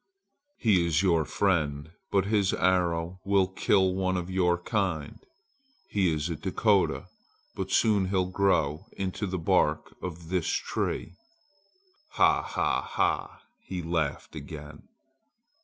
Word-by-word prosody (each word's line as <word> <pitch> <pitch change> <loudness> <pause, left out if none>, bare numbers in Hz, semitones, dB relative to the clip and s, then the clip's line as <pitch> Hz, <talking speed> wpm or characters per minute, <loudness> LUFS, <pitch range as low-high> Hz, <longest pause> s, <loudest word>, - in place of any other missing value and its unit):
"He 100 -7 +3
is 80 +2 +2
your 85 -5 +3
friend, 80 -6 0 0.2
but 95 -2 +2
his 100 -2 +2
arrow 90 -1 +1
will 100 -1 +3
kill 95 0 +2
one 95 0 0
of 90 +1 -4
your 90 -2 +2
kind! 90 -5 -2 0.7
He 95 -4 +2
is 75 0 -1
a 85 - -3
Dakota, - - +1 0.5
but 95 -1 -4
soon 105 -1 +3
he'll 95 -1 +1
grow 90 -3 +1
into 95 +2 -3
the 95 0 -2
bark 80 - +1
on 90 -3 -4
this 85 0 -2
tree! 90 - -2 1.0
Ha! - - +4
ha! - - 0
ha!" - - -1 0.2
he 90 - -5
laughed 80 -2 -2
again. 75 0 -9
90 Hz, 125 wpm, -28 LUFS, 80-95 Hz, 1.0 s, Ha